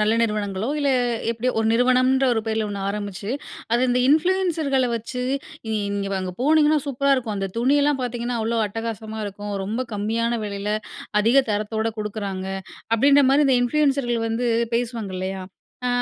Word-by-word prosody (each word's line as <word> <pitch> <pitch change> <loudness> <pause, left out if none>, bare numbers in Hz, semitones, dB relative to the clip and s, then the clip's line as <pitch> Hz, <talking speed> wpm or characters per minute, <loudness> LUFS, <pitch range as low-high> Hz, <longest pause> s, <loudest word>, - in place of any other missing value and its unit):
நல்ல 215 +1 +3
நிறுவனங்களோ 210 -1 -1
இல்ல 285 -1 +2 0.4
எப்படியோ 235 +2 0
ஒரு 225 - +1
நிறுவனம்ன்ற 255 +2 +3
ஒரு 225 - +1
பேர்ல 220 -1 0
ஒண்ணு 200 -1 -4
ஆரம்பிச்சு, 205 0 -4 0.4
அது 240 - +3
இந்த 245 0 +2
இன்ஃப்ளூயன்சர்கள 315 -4 +2
வச்சு, 235 +3 -5 0.5
நீங்க 200 -2 -1
அங்க 185 -1 -4
போனீங்கன்னா 305 +1 +4
சூப்பரா 280 +1 +1
இருக்கும். 225 -5 -3
அந்த 195 0 -2
துணியெல்லாம் 285 +3 +3
பார்த்தீங்கன்னா 240 0 -2
அவ்ளோ 230 +1 0
அட்டகாசமா 220 0 -5
இருக்கும். 205 +1 -6
ரொம்ப 220 +5 -2
கம்மியான 230 +3 0
விலையில 200 0 -3 0.5
அதிக 230 +5 +3
தரத்தோட 215 +1 -1
குடுக்குறாங்க. 200 -3 -4 0.5
அப்பிடின்ற 280 +4 +5
மாரி 285 +2 +4
இந்த 265 -2 +4
இன்ஃப்ளூயன்சர்கள் 270 -3 +1
வந்து 230 +2 -1 0.3
பேசுவாங்க 230 -5 -2
இல்லையா? 190 +1 -3 0.5
ஆ, - - +2
230 Hz, 145 wpm, -23 LUFS, 210-260 Hz, 0.5 s, அப்பிடின்ற